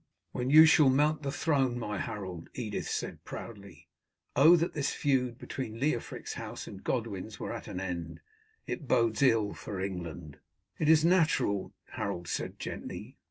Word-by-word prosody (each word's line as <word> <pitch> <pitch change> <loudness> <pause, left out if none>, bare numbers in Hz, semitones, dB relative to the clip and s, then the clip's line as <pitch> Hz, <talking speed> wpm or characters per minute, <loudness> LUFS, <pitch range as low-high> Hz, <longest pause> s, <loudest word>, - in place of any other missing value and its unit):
"When 125 +1 -2
you 155 +3 +10
shall 155 -3 +6
mount 150 +4 +3
the 140 -2 -2
throne, 140 -6 +1
my 105 -4 -3
Harold," 95 -5 -5
Edith 110 -5 -3
said - - -4
proudly. 100 -8 -9 0.5
"Oh, 155 +6 +8
that 170 0 0
this 145 -3 0
feud 125 -4 0
between 115 -5 -6
Leofric's 130 -3 -2
house - - -6
and - - -10
Godwin's - - -3
were - - -4
at - - -7
an 90 - -5
end. 90 -3 -4 0.5
It 145 - -5
bodes 115 -3 +2
ill 115 -6 +3
for 100 -3 -6
England." 90 -5 -5 0.4
"It 155 - +2
is 160 0 +6
natural," 160 - +2
Harold 85 0 -4
said - - -3
gently. - - -7
120 Hz, 160 wpm, -30 LUFS, 100-150 Hz, 0.5 s, you